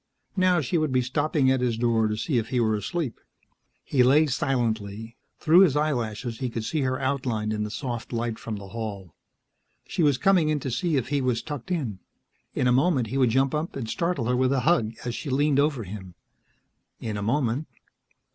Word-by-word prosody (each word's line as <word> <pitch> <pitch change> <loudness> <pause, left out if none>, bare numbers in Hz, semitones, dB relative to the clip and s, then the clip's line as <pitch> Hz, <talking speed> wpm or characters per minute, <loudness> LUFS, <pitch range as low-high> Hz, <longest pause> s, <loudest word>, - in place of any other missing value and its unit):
Now 185 -3 +3
she 155 +5 0
would 155 -3 0
be 130 -1 +2
stopping 140 +1 +1
at 130 -1 +1
his 120 -3 0
door 115 -2 +2
to 105 0 -2
see 120 +3 0
if 110 - -4
he 125 - 0
were 110 -2 +2
asleep. 135 - -3 0.6
He 130 - +1
lay 140 +5 +5
silently; 115 -5 -2 0.2
through 165 +3 +5
his 180 -8 +5
eyelashes 120 -6 -1
he 130 -2 -2
could 115 -1 -4
see 155 +4 -1
her 130 -1 0
outlined 125 -6 -1
in 105 - -2
the 105 - -3
soft 120 0 -5
light 115 -1 -2
from 110 - -5
the 100 -1 -9
hall. 100 -5 -6 0.7
She - - -2
was 145 -4 +4
coming 180 -3 +3
in 155 -1 +1
to 130 - -3
see 155 +7 0
if 125 -1 -2
he 145 -1 +1
was 125 -3 0
tucked 145 -3 -6
in. 130 - -2 0.6
In - - +1
a 125 - +4
moment 130 -3 +2
he 135 - -2
would 130 -3 +4
jump 135 +3 +2
up 155 +2 -2
and 125 -5 -4
startle 170 +1 -1
her 125 +2 +1
with 130 +1 +2
a 135 - +1
hug, 120 -9 +2
as 120 - -2
she 145 - -5
leaned 140 +1 +2
over 140 -5 +1
him. 95 -2 -9 0.8
In 110 -2 -4
a 100 - -3
moment.... 125 +5 0
125 Hz, 210 wpm, -26 LUFS, 115-145 Hz, 0.8 s, lay